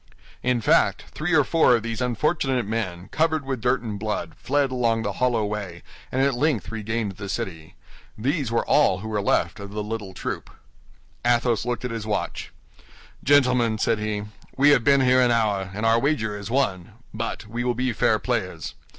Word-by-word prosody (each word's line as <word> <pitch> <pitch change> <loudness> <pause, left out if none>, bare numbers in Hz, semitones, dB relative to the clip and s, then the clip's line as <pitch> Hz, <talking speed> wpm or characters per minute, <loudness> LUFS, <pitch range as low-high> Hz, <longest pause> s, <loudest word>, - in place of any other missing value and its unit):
In 125 -1 +1
fact, - - +3
three 160 +3 -3
or 150 - +6
four 160 -3 +4
of 115 - -2
these 115 +1 -4
unfortunate 130 0 0
men, 100 -5 -3
covered 155 -2 +1
with 135 -3 -3
dirt 125 +1 +2
and 105 -3 -5
blood, 105 -6 -3
fled 140 0 0
along 115 -3 +1
the 100 - -1
hollow 120 -4 +2
way, 100 -5 -5 0.3
and 130 +1 +1
at 140 0 +2
length 125 - 0
regained 110 -3 -3
the 100 -1 -6
city. 80 -3 -5 0.4
These 135 +2 -1
were 115 - +1
all 95 -11 +3
who 110 - -6
were 105 -2 -1
left 100 - +1
of 100 0 -7
the 105 +1 -4
little 105 -3 -5
troop. - - -5 0.7
Athos 120 -1 +2
looked 125 +1 -2
at 125 - -3
his 115 -2 -5
watch. 105 - -3 0.7
"Gentlemen," 125 -5 +3
said 110 0 +1
he, 105 -1 -2 0.3
"we 145 +2 +6
have 125 -5 +4
been 140 +2 +5
here 130 0 +4
an 125 - +4
hour, 105 -5 +1
and 105 +3 -3
our 115 +1 +4
wager 115 -7 0
is 105 0 -7
won; 105 -7 -1 0.2
but 115 0 -4
we 115 +3 -4
will 125 -1 0
be 125 0 0
fair - - +2
players. - - -3
115 Hz, 190 wpm, -24 LUFS, 105-130 Hz, 0.7 s, or